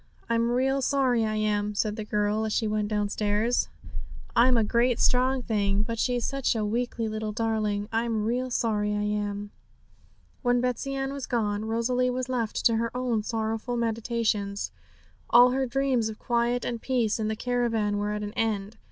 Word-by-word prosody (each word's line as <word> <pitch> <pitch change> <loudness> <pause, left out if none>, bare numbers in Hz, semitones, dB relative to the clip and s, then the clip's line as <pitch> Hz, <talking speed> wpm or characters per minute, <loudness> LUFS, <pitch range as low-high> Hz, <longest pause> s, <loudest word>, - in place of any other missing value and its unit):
'I'm 230 0 +2
real 265 +3 +1
sorry, 260 -4 +2
I 215 0 -1
am!' 210 -1 0
said 210 0 0
the 215 - -4
girl, 210 +1 0
as 220 - -2
she 220 - +1
went 210 -1 0
downstairs. 210 +2 0 0.7
'I'm 245 +1 +5
a 225 - +3
great 235 +2 +2
strong 255 +1 +3
thing, 205 -3 +1
but 230 0 -4
she's 245 -1 +1
such 275 -3 0
a 215 -2 0
weakly 230 +1 -1
little 215 0 -3
darling. 215 -2 -1
I'm 225 -1 0
real 250 +3 -1
sorry, 210 -4 0
I 210 - -1
am!' 205 -1 -2 0.9
When 245 -1 +2
Betsey 250 +2 -1
Ann 270 0 -2
was 280 -2 -5
gone, 210 -3 -1
Rosalie 240 +3 +1
was 255 +1 -3
left 235 -4 -2
to 230 -1 +5
her 230 +1 0
own 245 -4 0
sorrowful 225 +2 -2
meditations. 225 -3 -1 0.6
All 245 +1 +7
her 265 +1 0
dreams 255 -3 +1
of 215 - -7
quiet 240 +1 0
and 235 -2 -3
peace 235 -5 0
in 215 - -1
the 220 - -1
caravan 225 -3 0
were 205 0 -1
at 210 0 -3
an 205 0 -5
end. 215 -2 -2
225 Hz, 180 wpm, -27 LUFS, 210-245 Hz, 0.9 s, All